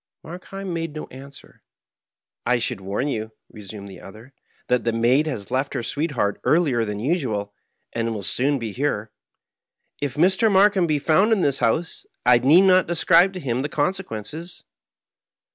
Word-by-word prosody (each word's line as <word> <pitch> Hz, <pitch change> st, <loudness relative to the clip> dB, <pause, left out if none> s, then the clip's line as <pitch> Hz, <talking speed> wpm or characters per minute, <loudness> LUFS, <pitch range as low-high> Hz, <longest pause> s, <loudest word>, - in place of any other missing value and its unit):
Harkheim 185 Hz, +3 st, -7 dB
made 165 Hz, -2 st, -4 dB
no 155 Hz, -, -5 dB
answer. 140 Hz, +2 st, -13 dB, 0.4 s
" -, -, -45 dB
I -, -, +3 dB
diould 115 Hz, -4 st, -2 dB
warn 100 Hz, +7 st, -3 dB
you/' 110 Hz, -5 st, -4 dB, 0.2 s
resumed 100 Hz, -1 st, -10 dB
the 95 Hz, -3 st, -12 dB
other, 110 Hz, +7 st, -13 dB, 0.2 s
" -, -, -37 dB
that 125 Hz, -1 st, +1 dB
the 115 Hz, -, +1 dB
maid 120 Hz, +7 st, +2 dB
has 110 Hz, -10 st, -5 dB
left 135 Hz, +2 st, -1 dB
her -, -, -2 dB
sweetheart 140 Hz, -7 st, -2 dB
earlier 145 Hz, -8 st, +2 dB
than 105 Hz, -2 st, -4 dB
usual 110 Hz, -, -2 dB, 0.4 s
and 115 Hz, 0 st, -1 dB
will 100 Hz, -, -6 dB
soon 140 Hz, +8 st, +1 dB
be 115 Hz, -4 st, -5 dB
here. 110 Hz, -4 st, -2 dB, 0.9 s
If 140 Hz, -2 st, -3 dB
Mr. 190 Hz, +7 st, +3 dB
Markheim 195 Hz, -2 st, +4 dB
be 155 Hz, -2 st, +1 dB
found 165 Hz, +9 st, +2 dB
in 205 Hz, -5 st, +2 dB
this 140 Hz, -1 st, +2 dB
house, 160 Hz, +9 st, -1 dB, 0.2 s
I 125 Hz, -1 st, +6 dB
need 150 Hz, +9 st, +6 dB
not 185 Hz, -2 st, +4 dB
describe 175 Hz, +2 st, +4 dB
to 185 Hz, -, -6 dB
him 125 Hz, -5 st, -2 dB
the 145 Hz, -, -3 dB
consequences." 160 Hz, -, -4 dB
140 Hz, 170 wpm, -22 LUFS, 115-170 Hz, 0.9 s, I